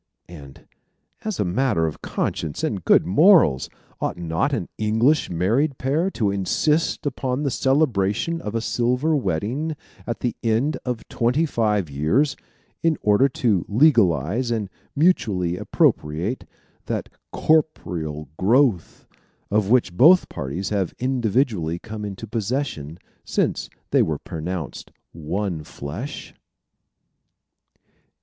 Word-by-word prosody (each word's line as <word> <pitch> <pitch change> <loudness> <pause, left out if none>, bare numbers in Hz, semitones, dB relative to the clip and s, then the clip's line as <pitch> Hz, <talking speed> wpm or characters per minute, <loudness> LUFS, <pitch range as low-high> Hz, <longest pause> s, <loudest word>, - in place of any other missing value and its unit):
And 70 -6 -13 0.6
as 215 -3 -3
a - - +1
matter 100 -2 +1
of 80 - -4
conscience 80 -3 -3
and - - -2
good - - +4
morals, 150 - +5 0.3
ought - - -2
not 85 - -1
an 110 -11 -2
English 110 +8 +2
married 115 - +1
pair 150 +8 0
to 110 - 0
insist 150 - 0
upon 130 0 -2
the 140 - 0
celebration 130 +2 +1
of 105 +2 -5
a 115 - 0
silver 125 +7 +1
wedding 125 - -1 0.3
at 115 - -4
the 120 -2 -1
end 115 +7 +1
of 125 -3 -4
twenty 125 +7 +1
five 105 - 0
years 80 - +1 0.5
in 165 -3 +2
order 105 +6 +4
to 110 -8 +1
legalize 110 - +3
and 110 -4 -2 0.2
mutually 105 - +2
appropriate 85 +7 0 0.4
that - - -2 0.2
corporeal 85 - 0
growth 115 - +2 0.5
of 105 -1 +1
which 115 -7 +3
both 170 - +6
parties 80 +7 -4
have 100 -4 -1
individually 115 - 0
come 110 +3 -8
into 100 +1 -6
possession 110 - -3 0.3
since - - -1 0.2
they - - +4
were - - 0
pronounced 80 0 -6 0.2
one 85 +1 -3
flesh? 80 - -7
110 Hz, 120 wpm, -23 LUFS, 90-135 Hz, 0.6 s, both